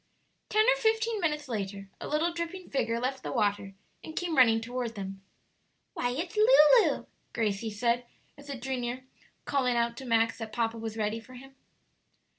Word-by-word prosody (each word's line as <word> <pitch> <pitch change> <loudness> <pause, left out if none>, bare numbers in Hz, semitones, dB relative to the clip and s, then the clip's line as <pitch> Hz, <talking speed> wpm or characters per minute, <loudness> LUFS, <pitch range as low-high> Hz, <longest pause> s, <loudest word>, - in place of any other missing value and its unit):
Ten 430 +1 +4
or - - +5
fifteen 445 -2 +1
minutes 300 -3 -1
later 200 -4 -4
a - - -6
little 320 +3 0
dripping 340 +2 -5
figure 230 -4 0
left 260 +2 -2
the - - -5
water, 205 -4 0 0.3
and 315 - -9
came 350 -3 -1
running 230 -4 +6
toward 240 0 -4
them. 195 -1 -6 0.7
"Why, 245 - -1
it's 330 - -4
Lulu," 435 -1 +6 0.3
Gracie 220 -1 -1
said, 235 +3 0 0.3
as 285 0 -14
it 270 -3 -6
drew 265 0 -2
near, 245 +1 -4 0.4
calling 255 -4 +1
out 235 0 +1
to 265 - -7
Max 225 -1 +2
that 220 -2 -6
papa 230 -1 -1
was 225 0 -5
ready 215 +1 -1
for 255 +3 -14
him. 270 +2 -12
245 Hz, 175 wpm, -29 LUFS, 225-300 Hz, 0.7 s, running